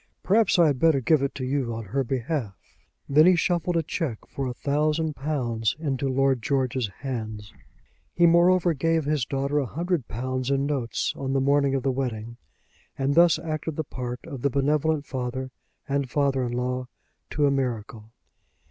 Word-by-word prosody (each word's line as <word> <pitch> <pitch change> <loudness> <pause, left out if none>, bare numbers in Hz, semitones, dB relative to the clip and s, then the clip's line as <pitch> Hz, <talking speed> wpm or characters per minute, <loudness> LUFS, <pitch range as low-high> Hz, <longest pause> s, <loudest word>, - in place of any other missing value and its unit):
Perhaps 210 0 +3
I 170 - +6
had 145 -4 +1
better 160 -2 +4
give 145 +3 +3
it 140 - -2
to 130 - -4
you 130 -3 -1
on 115 - -5
her 135 +8 -1
behalf." 130 - -3 0.5
Then 155 +4 +6
he 185 - +6
shuffled 175 0 0
a 165 - +1
cheque 145 - -4
for 135 -1 -4
a 125 - -3
thousand 150 +3 0
pounds 120 -7 -1
into 140 -4 -2
Lord 135 -1 +2
George's 130 -2 0
hands. 110 -6 -5 0.6
He 175 - +5
moreover 175 +1 +4
gave 160 +1 0
his 150 -4 0
daughter 140 +2 -1
a 135 - -1
hundred 170 -2 -2
pounds 130 +3 -3
in 140 0 +1
notes 135 -5 -1
on 135 -1 -3
the 135 - +2
morning 140 0 +2
of 135 - -1
the 135 - +1
wedding, 120 -3 -4 0.6
and 135 +1 +1
thus 170 +1 +5
acted 155 -1 -4
the 155 - -2
part 125 -3 -6
of 140 -6 -7
the 140 - +2
benevolent 145 +2 +1
father 130 0 -4 0.4
and 140 -2 -1
father 140 -1 +1
in 120 - -3
law 125 +1 -2 0.4
to 150 - +1
a 140 - +3
miracle. 115 -5 -3
135 Hz, 180 wpm, -25 LUFS, 125-155 Hz, 0.6 s, I